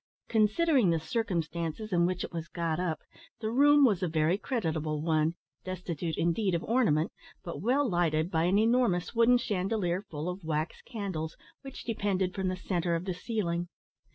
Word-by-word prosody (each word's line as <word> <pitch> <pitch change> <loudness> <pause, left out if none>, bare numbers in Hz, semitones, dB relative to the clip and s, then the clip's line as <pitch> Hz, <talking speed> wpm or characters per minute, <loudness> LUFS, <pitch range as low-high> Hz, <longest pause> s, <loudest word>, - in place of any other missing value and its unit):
Considering 230 - +3
the 165 -1 +2
circumstances 170 +1 -2
in 170 0 +4
which 180 0 -2
it - - -7
was 165 -1 -4
got 165 -1 -2
up, 165 -4 -2 0.4
the 220 -1 -2
room 290 +3 +6
was 205 -7 +2
a 180 - +1
very 160 +2 +2
creditable 160 - -2
one, 160 +1 +1 0.3
destitute, 175 -3 -4
indeed, 175 +3 +1
of 170 - -2
ornament, 215 -10 +2 0.3
but 170 - -6
well 260 +7 +2
lighted 170 -3 +1
by 160 0 +2
an 185 +3 +3
enormous 220 -5 +2
wooden 235 +1 +5
chandelier, 190 -4 -1
full 155 +1 -4
of 180 +1 -4
wax 155 0 -2
candles, 190 -9 -5 0.2
which 270 -1 -9
depended 195 -5 -1
from 190 -2 -2
the 185 0 -1
centre 175 -2 -1
of 165 +2 -3
the 185 - -1
ceiling. 175 -3 -2
180 Hz, 170 wpm, -30 LUFS, 165-220 Hz, 0.4 s, room